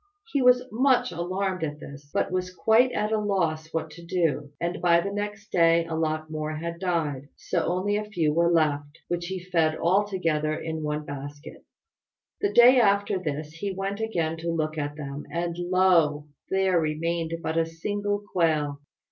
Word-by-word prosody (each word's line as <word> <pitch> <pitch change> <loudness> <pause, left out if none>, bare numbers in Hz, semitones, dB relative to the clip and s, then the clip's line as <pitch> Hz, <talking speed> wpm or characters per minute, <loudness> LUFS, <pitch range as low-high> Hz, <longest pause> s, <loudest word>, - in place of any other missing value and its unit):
He 280 - +1
was 250 0 +5
much 255 -1 +3
alarmed 185 +2 -2
at 150 -1 -3
this, 140 0 -11
but - - 0
was 185 0 -2
quite 225 +7 +3
at 210 +1 -1
a 220 - +2
loss 165 -6 -1
what 160 -1 -3
to 170 +2 -12
do; 165 -4 0
and 170 +1 -2
by 170 -1 +5
the 200 +3 -2
next 205 0 -5
day 165 -1 +4
a 165 - -6
lot 155 -1 -1
more 155 0 -4
had 170 +2 -5
died, 155 -7 -2
so 175 - -2
that - - -1
only 190 +4 0
a 210 - -3
few 170 -8 0
were 170 +1 +3
left, 145 -2 +1
which 175 0 -2
he 190 0 -3
fed 165 -4 +1
all 190 +5 +3
together 155 -6 0
in 160 0 -4
one 150 0 -3
basket. 145 +1 -8 0.8
The 405 - 0
day 250 +2 +7
after 200 -3 +2
this 150 -3 -4
he 190 +4 -4
went 195 +2 -3
again 170 -8 -1
to 170 +1 -4
look 155 -2 -1
at 145 -1 -3
them, 145 -1 -7
and 170 0 -2
lo! 175 -5 +3 0.2
there 190 -2 +2
remained 165 +1 -1
but 160 - -2
a 165 0 +2
single 205 +5 -2
quail. 150 -5 +1
170 Hz, 185 wpm, -26 LUFS, 155-190 Hz, 0.8 s, day